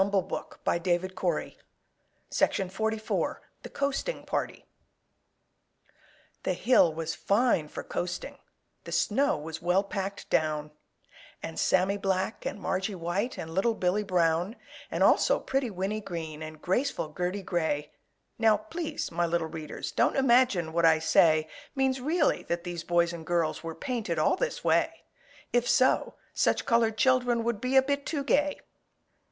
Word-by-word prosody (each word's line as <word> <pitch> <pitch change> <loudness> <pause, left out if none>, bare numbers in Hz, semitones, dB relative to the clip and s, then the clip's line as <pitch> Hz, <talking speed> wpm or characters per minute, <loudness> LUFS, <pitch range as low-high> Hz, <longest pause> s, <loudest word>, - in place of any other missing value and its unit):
I - - +7
shan't 195 -2 -1
ask 170 +1 -3
any 175 +1 +1
questions." 185 - -2 2.0
THE - - -9
COASTING 280 - -2
PARTY - - -3 1.8
The - - 0
hill 240 -9 +4
was 160 +1 -3
fine 200 -7 +2
for - - -7
coasting, 180 0 -4 0.5
The - - -7
snow 275 +6 +2
was 160 +1 -7
well 180 +3 +2
packed 195 0 -5
down, 150 -1 0 0.7
And 80 0 -5
Sammy 190 +2 +2
Black 190 +1 -1
and - - -5
Margie 195 +1 -2
White, 180 +8 -2
And 160 0 -6
little 220 +6 +1
Billy 185 +2 +1
Brown, 180 +1 +1 0.3
And - - 0
also - - +4
pretty 265 -2 -1
Winnie 195 +2 -3
Green 165 -5 -6
And 155 0 -8
graceful 190 - -1
Gertie 180 +3 -2
Gray 160 -5 -1 0.5
Now, 220 -2 +5
please, 305 +9 -5
my 170 +1 0
little 170 0 0
readers, 155 -2 -6
Don't - - +2
imagine 240 -11 +3
what 170 0 +1
I 160 -1 +6
say 155 -1 +4 0.3
Means 265 -1 +1
really 305 +3 +1
that 170 0 -1
these 175 -2 -5
boys 170 0 +2
and 165 -1 -7
girls 165 -1 0
Were 165 -1 -5
painted 235 - -3
all 155 - +3
this - - -3
way; - - +1 0.5
If 245 0 +2
so, 255 - +3 0.2
such - - +1
colored 230 -2 +2
children 245 -1 +3
Would 230 -3 -1
be 255 +1 -1
a 265 - +7
bit 280 +1 -2
too 290 -3 -2
gay! 290 +1 +1
190 Hz, 145 wpm, -28 LUFS, 170-245 Hz, 2.0 s, I